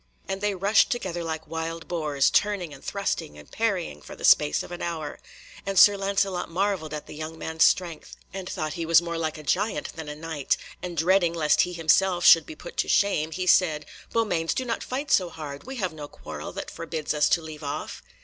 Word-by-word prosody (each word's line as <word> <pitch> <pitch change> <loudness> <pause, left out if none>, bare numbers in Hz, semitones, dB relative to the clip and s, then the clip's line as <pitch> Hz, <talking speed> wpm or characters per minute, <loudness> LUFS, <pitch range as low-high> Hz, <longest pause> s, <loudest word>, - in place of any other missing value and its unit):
And 195 0 -3
they 205 -1 0
rushed 200 +4 +4
together 185 -9 -3
like 160 -1 -4
wild 165 +1 -5
boars, 150 -5 +1
turning 195 -7 +1
and - - -13
thrusting 75 - -3
and 75 - -14
parrying 190 - -1
for - - -10
the - - -4
space 75 - +5
of - - -11
an 175 - -6
hour, 160 -3 -4 0.4
and 195 -1 -3
Sir 205 +2 +8
Lancelot 195 -2 -1
marvelled 185 -3 -1
at 150 -1 -5
the - - -10
young 155 +1 -6
man's 160 0 0
strength, 170 -4 0 0.2
and 190 -1 -6
thought 155 -1 -3
he 170 - -4
was 165 0 +6
more 170 -1 -4
like 155 -1 -2
a 155 - -10
giant 200 +9 0
than 160 -2 -7
a 150 - -5
Knight, 155 -2 -1 0.2
and 175 -1 -6
dreading 175 +1 +3
lest 150 -3 +3
he 180 - -1
himself 175 +2 +2
should 165 -2 +8
be 155 - -8
put 175 - -11
to - - +1
shame, 175 -6 +2
he 185 +3 -3
said: 160 -4 +3 0.3
"Beaumains, 180 -8 0
do 260 - -1
not 230 -2 -2
fight 275 +3 -4
so 180 -2 +4
hard, 150 -4 -8
we 265 +1 -6
have 185 -8 -2
no 150 -2 -7
quarrel - - -8
that - - -6
forbids 155 -2 -3
us 150 -1 +3
to 170 - +3
leave 155 -1 -9
off." 145 +1 -5
170 Hz, 215 wpm, -26 LUFS, 155-190 Hz, 0.4 s, Sir